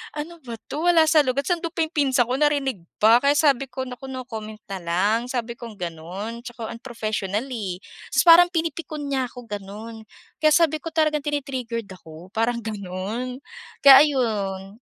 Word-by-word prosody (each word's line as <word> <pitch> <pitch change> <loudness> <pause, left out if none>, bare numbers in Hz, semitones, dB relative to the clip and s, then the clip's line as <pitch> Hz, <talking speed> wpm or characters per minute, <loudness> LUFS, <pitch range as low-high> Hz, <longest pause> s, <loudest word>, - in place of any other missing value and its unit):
“Ano 330 +3 -6
ba 235 -2 -6
'to, 300 +8 -4
wala 340 -2 +6
sa 315 - +5
lugar.” 260 +2 0
Ta’s 355 +2 0
andun 335 - -3
pa 330 - +2
'yong 315 - -4
pinsan 270 -4 +3
ko 255 - +1
narinig 285 -6 +1 0.2
pa. 225 +3 +7
Kaya 280 +2 +3
sabi 275 -3 +3
ko, 260 +1 -5
“Naku 255 +1 -8
no 260 -1 -6
comment 220 -3 -8
na 195 - -3
lang.” 185 +6 +1
Sabi 240 -2 -4
kong 230 -3 -9
gano'n, 180 +6 -6
tsaka 235 -2 -7
unprofessional 220 -3 -3
eh. 195 -7 -4 0.3
Ta’s - - +4
parang 345 +1 +8
pinipikon 325 -2 -3
niya 265 -2 0
ako 240 -2 -13
gano'n. 215 +2 -8 0.3
Kaya 310 0 +4
sabi 315 -2 +3
ko, 330 -1 -8
talagang 310 -1 +2
tini-triggered 255 -7 -3
ako. 170 0 -13
Parang 230 +2 -1
gano'n 215 +5 -5 0.4
kaya 275 -1 +11
ayon. 205 -7 -2
240 Hz, 175 wpm, -23 LUFS, 215-285 Hz, 0.4 s, kaya